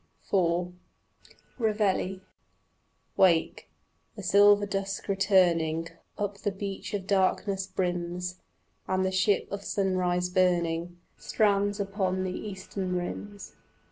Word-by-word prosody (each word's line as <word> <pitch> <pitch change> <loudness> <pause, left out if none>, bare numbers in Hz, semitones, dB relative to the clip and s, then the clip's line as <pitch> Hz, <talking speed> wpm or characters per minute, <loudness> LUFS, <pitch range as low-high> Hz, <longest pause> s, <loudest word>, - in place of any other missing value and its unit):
IV 175 -2 +2 0.9
REVEILLE 205 -4 0 1.0
Wake: 170 -4 +3 0.5
the 205 - -8
silver 205 +2 +5
dusk 195 0 -3
returning 175 -5 +2 0.3
Up 205 -1 -3
the 205 - -1
beach 195 +1 -5
of 195 -2 -4
darkness 195 0 +1
brims, 180 -1 -3 0.5
And 190 0 +1
the 190 - 0
ship 195 +2 +2
of 200 0 -4
sunrise 185 -3 0
burning 175 -2 +1 0.2
Strands 205 -1 +1
upon 195 -2 -1
the 185 - -2
eastern 190 -2 -5
rims. 200 +3 -5
190 Hz, 105 wpm, -28 LUFS, 180-200 Hz, 1.0 s, silver